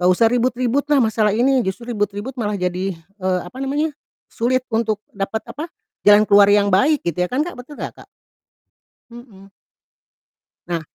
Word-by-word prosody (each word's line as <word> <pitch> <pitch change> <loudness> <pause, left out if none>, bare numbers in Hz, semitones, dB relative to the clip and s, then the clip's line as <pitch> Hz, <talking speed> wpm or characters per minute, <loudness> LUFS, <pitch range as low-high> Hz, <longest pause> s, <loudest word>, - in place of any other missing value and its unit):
nggak 180 +1 +4
usah 225 +3 +4
ribut-ribut 250 +2 +1
lah 290 - +5
masalah 215 -2 +2
ini 260 +3 +3
justru 235 +5 -4
ribut-ribut 205 +4 -3
malah 205 -1 -1
jadi, 180 +1 -2
eee, 185 +2 -3
apa 180 +8 -12
namanya, 295 +3 -1 0.4
sulit 255 +2 0
untuk 220 -2 0
dapat, 200 +2 -3
apa, 300 - -5 0.4
jalan 205 +1 +7
keluar 200 -1 +6
yang 205 0 +4
baik 280 +10 +3
gitu 180 +1 0
ya - - -14
kan, 275 +4 0
Kak, 350 - -6
betul 265 +4 -11
nggak, - - -5
Kak? - - -15 1.0
Mhm. 225 -5 -14 1.2
Nah 170 -1 -2
215 Hz, 165 wpm, -20 LUFS, 195-255 Hz, 1.2 s, jalan